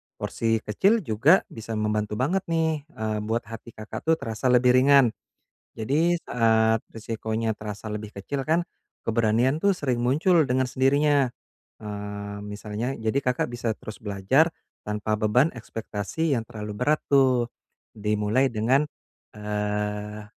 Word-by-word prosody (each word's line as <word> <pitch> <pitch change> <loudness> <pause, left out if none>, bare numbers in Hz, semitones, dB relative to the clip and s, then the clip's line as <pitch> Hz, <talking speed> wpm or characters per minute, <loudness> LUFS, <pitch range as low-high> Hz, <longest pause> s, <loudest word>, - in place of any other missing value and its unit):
porsi 115 -1 -1
kecil 195 - +2
juga 135 - +4
bisa 115 0 -6
membantu 105 -1 -1
banget 150 - +1
nih, 160 -3 0
eee, 110 -8 -3
buat 115 +2 -1
hati 115 0 -9
Kakak 110 0 -7
tuh 160 - +5
terasa 115 -3 -3
lebih 125 0 +5
ringan. 135 -1 +6 0.7
Jadi 150 +10 +2
saat 110 -1 +3
resikonya 110 0 -2
terasa 105 +1 -6
lebih 105 0 -6
kecil 135 +8 -3
kan, 165 +2 +3 0.4
keberanian 115 +4 +2
tuh 200 - +4
sering 130 -6 -1
muncul 155 +8 +3
dengan 130 +1 +2
sendirinya. 140 +1 +3 0.5
Eee, 105 -1 -6
misalnya 105 +4 -4
jadi 110 +4 0
Kakak 125 -1 0
bisa 120 -1 -2
terus 110 - -9
belajar 105 - +2 0.3
tanpa 105 +1 -2
beban 110 +6 +3
ekspektasi 115 +6 -3
yang 115 - 0
terlalu 105 -1 -6
berat 150 +7 +2
tuh 130 -4 +4 0.5
dimulai 105 +5 +1
dengan, 120 +5 +2 0.5
eee, 105 0 -3
115 Hz, 130 wpm, -25 LUFS, 105-135 Hz, 0.7 s, ringan